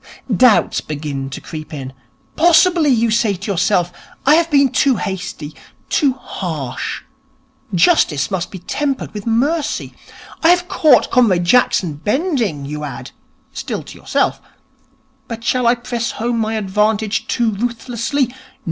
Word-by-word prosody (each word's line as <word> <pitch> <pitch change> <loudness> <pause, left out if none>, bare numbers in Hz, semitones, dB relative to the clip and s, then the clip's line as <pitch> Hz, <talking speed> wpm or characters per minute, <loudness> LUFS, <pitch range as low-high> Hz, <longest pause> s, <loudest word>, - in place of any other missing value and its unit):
Doubts 235 +2 +4
begin 145 -3 -5
to 130 - -6
creep 155 -2 -8
in. 135 -3 -7 0.4
Possibly, 340 -1 +4
you 230 -3 +2
say 220 -2 +2
to 200 +3 -5
yourself, 175 -1 +1 0.3
I 285 - +6
have 335 +1 +3
been 280 -4 +4
too 275 -3 +3
hasty, 180 -6 -5 0.4
too 280 -4 +2
harsh. 155 - -5 0.7
Justice 170 - +3
must 185 -2 -2
be 190 - -8
tempered 275 +9 -3
with 210 +1 -7
mercy. 285 +8 0 0.5
I 325 - +4
have 355 0 +3
caught 300 -8 +4
Comrade 210 -8 +3
Jackson 180 -5 +3
bending, 215 - -1
you 150 +1 -5
add 130 -3 -7 0.4
(still - - -4
to - - -12
yourself), - - 0 0.9
but 230 -1 -7
shall 250 0 +1
I 235 - +5
press 235 -1 -3
home 235 +1 -2
my 220 0 -1
advantage 210 +1 0
too 235 -2 +1
ruthlessly? 240 +4 -2
225 Hz, 140 wpm, -18 LUFS, 175-260 Hz, 0.9 s, I